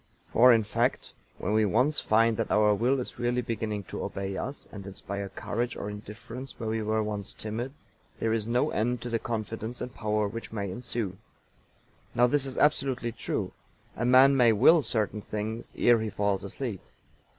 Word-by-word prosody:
For, 125 +2 +6
in 115 -2 +5
fact, 105 - -1 0.2
when 105 - -2
we 110 0 +4
once 130 +10 +2
find 115 +1 +3
that - - -1
our 105 0 +4
will 125 +6 +2
is 125 - -6
really 120 +1 0
beginning 110 -3 -3
to - - -6
obey 95 0 -4
us, 135 +8 -5
and 100 -2 -8
inspire 100 +1 -5
courage 120 +4 -3
or 105 - -4
indifference 115 +5 -9
where 110 -2 -3
we 110 0 -1
were 110 0 0
once 105 -2 -3
timid, 115 +4 -4 0.5
there 110 0 +1
is 110 -1 -1
no 125 +6 +1
end 120 +3 0
to 120 - -5
the 115 - +1
confidence 115 +1 -4
and 125 0 -5
power 105 -1 0
which 115 +3 -7
may 100 -3 -3
ensue. 115 -3 -3 1.0
Now 120 - +5
this 140 +2 +1
is 130 - -6
absolutely 135 -5 +2
true. 115 - -3 0.4
A 120 - -3
man 130 +3 +7
may 120 -4 +5
will 160 +10 +6
certain 110 -5 -1
things 110 +3 -4
ere 120 -1 +5
he 110 0 -2
falls 100 -1 0
asleep. 100 0 -5
115 Hz, 185 wpm, -28 LUFS, 105-125 Hz, 1.0 s, man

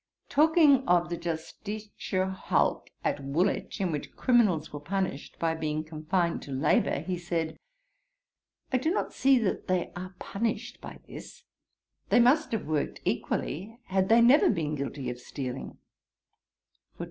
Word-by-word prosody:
Talking 300 -3 +5
of 175 -1 +3
the - - 0
Justitia 185 +4 -4
hulk 190 - 0
at 145 - -1
Woolwich, 165 +11 0
in 185 -3 0
which 150 -2 -5
criminals 210 - +2
were 145 - -4
punished, 175 -2 -3
by 165 -1 0
being 155 -1 -2
confined 165 +2 -1
to 140 - -9
labour, 135 +3 +2
he 180 -2 -3
said, 170 -2 -3 1.1
'I - - +5
do 315 - 0
not 370 - -1
see 270 0 +4
that 220 -6 -1
they 185 -1 0
are 185 +1 -7
punished 225 +3 -3
by - - -9
this: - - -11 0.7
they - - +5
must 280 +6 +4
have 225 - -2
worked 155 -1 -2
equally 195 - -2
had 190 0 0
they 230 +1 +6
never 255 +6 +6
been 155 -2 0
guilty 140 -2 -4
of 125 - -8
stealing. 130 0 -6
180 Hz, 145 wpm, -28 LUFS, 155-225 Hz, 1.1 s, they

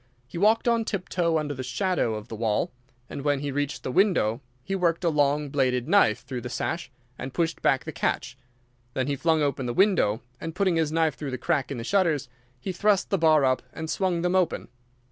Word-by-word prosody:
He 155 +7 -7
walked 220 +4 +3
on 230 -1 +3
tiptoe 175 -5 -1
under 150 -2 -2
the 130 - -6
shadow 130 - 0
of 105 -1 -7
the 110 - -6
wall, 110 -1 0 0.4
and 140 - -6
when 145 -1 +1
he 145 -1 -2
reached 145 +1 -2
the - - -3
window 135 - +2 0.2
he 195 - -4
worked 175 -2 +1
a 170 - +3
long 145 -1 +1
bladed 130 -3 +1
knife 105 - +4
through 125 -2 -5
the 125 - -6
sash 165 +3 -3 0.3
and 130 0 -6
pushed 165 -1 -1
back 130 - +2
the 160 - -4
catch. 135 -3 -2 0.6
Then 130 - 0
he 140 +1 -1
flung 160 +2 +2
open 135 -3 -1
the 120 - -3
window, 185 - +3 0.2
and 165 0 -6
putting 190 -2 +2
his 160 -2 +1
knife 160 -1 +2
through 145 - -6
the 130 - -3
crack 145 +1 0
in 140 - -4
the 115 - -5
shutters, 160 -4 +1 0.3
he 190 - -4
thrust 200 +2 +1
the 195 - +2
bar 155 -3 +5
up 130 0 +2
and 160 0 -5
swung 180 -3 0
them 180 0 +1
open. 180 -3 0
150 Hz, 220 wpm, -26 LUFS, 130-175 Hz, 0.6 s, bar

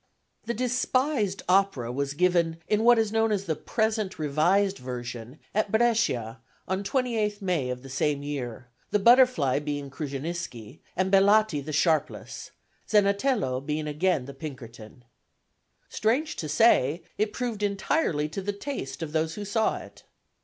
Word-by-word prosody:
The 235 - -1
despised 250 -3 0
opera 180 -11 +2
was 140 +2 -2
given 170 -1 +2
in 215 +1 +1
what 240 0 +6
is 220 -2 +1
known 225 0 +2
as 200 -2 -1
the 160 -3 -1
present 220 +1 -1
revised 175 +7 +2
version 125 0 -7 0.2
at 210 -1 0
Brescia, 220 - +1 0.3
on 190 +1 -1
28 220 -3 -1
May 175 - -1
of 125 0 -5
the - - -9
same 140 +2 -1
year, 125 -5 -5 0.2
the - - +2
Butterfly 235 - +5
being 145 -2 -4
Krusceniski, 140 -4 -5 0.2
and 190 +1 0
Bellati 200 -5 +4
the 155 - -6
Sharpless, 155 0 -1 0.4
Zenatello 200 - +2
being 150 +1 -2
again 150 -2 0
the 140 - -8
Pinkerton. 125 -5 -10 0.8
Strange 265 +9 0
to 155 - -4
say, 155 - +3 0.2
it 210 0 +1
proved 235 -4 -3
entirely 200 - 0
to 175 +6 -5
the 205 +2 -2
taste 200 - -5
of 155 - -5
those 160 0 -1
who 210 - -5
saw 220 +2 +1
it. - - -12
180 Hz, 145 wpm, -27 LUFS, 140-215 Hz, 0.8 s, what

